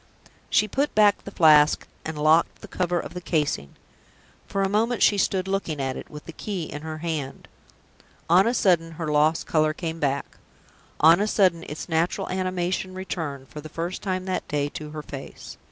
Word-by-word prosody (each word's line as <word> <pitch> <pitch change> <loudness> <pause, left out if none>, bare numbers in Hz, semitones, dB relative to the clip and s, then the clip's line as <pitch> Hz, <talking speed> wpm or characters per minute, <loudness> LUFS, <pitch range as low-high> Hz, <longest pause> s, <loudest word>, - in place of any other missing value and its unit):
She 210 - +3
put 275 +8 -1
back 210 -2 +4
the - - -5
Flask, 150 -2 +5 0.2
and 160 -1 -5
locked 155 +2 +3
the - - -10
cover 180 -1 -1
of - - -7
the 180 - -6
casing. 150 - -1 0.7
For 195 - -1
a - - +2
moment 225 +4 +1
she 205 - +5
stood 190 -1 0
looking 190 -6 -2
at 135 -1 -2
it, - - -8
with 150 -1 -10
the - - -8
key 190 +2 -4
in 150 -1 -7
her 155 0 -6
hand. 155 -4 -4 0.8
On 180 +5 +5
a 240 - +1
sudden, 165 -6 +2
her 160 -1 -4
lost 150 +2 +2
color 155 -1 +2
came 165 -2 -4
back. 140 -1 -2 0.6
On 165 +3 +7
a 210 - +1
sudden, 185 -6 +2
its 150 - -6
natural 165 +1 0
animation 185 0 -2
returned, 155 -8 -5
for 150 +6 -8
the 155 - -10
first 170 +3 -4
time 185 -2 -2
that 185 -1 -3
day, 145 -1 -1
to 150 +1 -7
her 150 0 -7
face. 135 -2 -9
165 Hz, 190 wpm, -25 LUFS, 150-185 Hz, 0.8 s, On